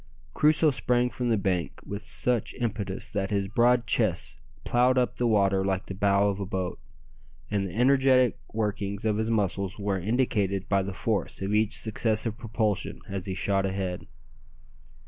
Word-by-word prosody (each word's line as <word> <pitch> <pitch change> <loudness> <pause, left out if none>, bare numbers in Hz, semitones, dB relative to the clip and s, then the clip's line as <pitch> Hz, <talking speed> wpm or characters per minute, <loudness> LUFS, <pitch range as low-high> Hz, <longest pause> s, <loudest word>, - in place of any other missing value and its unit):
Crusoe 155 0 +4
sprang 125 -2 +1
from 125 -1 -2
the 115 - +3
bank 90 -6 -1
with 100 +1 -5
such 120 -1 0
impetus 105 -5 -3
that 95 -2 -2
his 100 -2 0
broad 120 +3 +3
chest 85 - 0 0.2
ploughed 125 +1 +3
up 125 -1 +1
the 120 - +1
water 100 -3 +3
like 95 -1 -1
the - - -6
bow 100 +1 +2
of 100 -1 -1
a 100 - -3
boat, 95 -3 -3 0.7
and 100 -2 0
the 90 - -9
energetic 130 0 +4
workings 100 -2 -2
of 105 -1 +1
his 110 +1 -1
muscles 100 -3 -1
were 100 -2 -1
indicated 100 -2 0
by 100 -1 +2
the 95 +1 -4
force 105 +2 -2
of 100 +2 -1
each 110 +1 +2
successive 110 0 0
propulsion 110 -4 -2
as 95 -1 -4
he 95 - -3
shot 95 +1 0
ahead. 95 -2 -3
105 Hz, 165 wpm, -27 LUFS, 95-120 Hz, 0.7 s, Crusoe